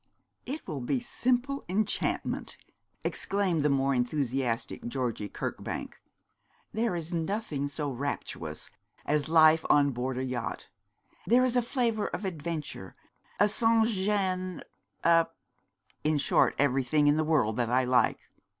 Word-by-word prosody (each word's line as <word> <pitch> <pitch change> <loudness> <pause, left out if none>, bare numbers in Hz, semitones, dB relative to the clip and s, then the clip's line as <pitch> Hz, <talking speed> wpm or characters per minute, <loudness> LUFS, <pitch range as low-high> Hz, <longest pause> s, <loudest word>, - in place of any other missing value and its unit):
'It 285 +5 -5
will 145 -4 -4
be 125 - 0
simple 255 +3 -1
enchantment,' 210 +4 -1 0.5
exclaimed 195 -5 0
the 150 - +2
more 135 0 +2
enthusiastic 125 -2 -1
Georgie 120 -5 -2
Kirkbank. - - -5 0.7
'There 220 -3 0
is 170 +1 -4
nothing 165 -4 -2
so 145 0 -3
rapturous 140 +3 -4 0.3
as 150 0 0
life 160 0 +6
on 145 -1 +5
board 125 +1 -3
a 130 - -1
yacht; 125 -2 -4 0.6
there 250 +3 +5
is 250 -1 0
a 245 - +4
flavour 235 -3 0
of 205 - -4
adventure, 155 - -5 0.4
a 205 - +6
sansgêne, 205 -4 +1 0.4
a 165 0 +5 0.8
in 155 0 +2
short 140 - +3
everything 140 +1 +2
in 145 +1 +4
the 155 - +2
world 150 -9 +2
that 120 -2 0
I 130 +2 +3
like. 125 -2 +2
155 Hz, 130 wpm, -29 LUFS, 135-205 Hz, 0.8 s, life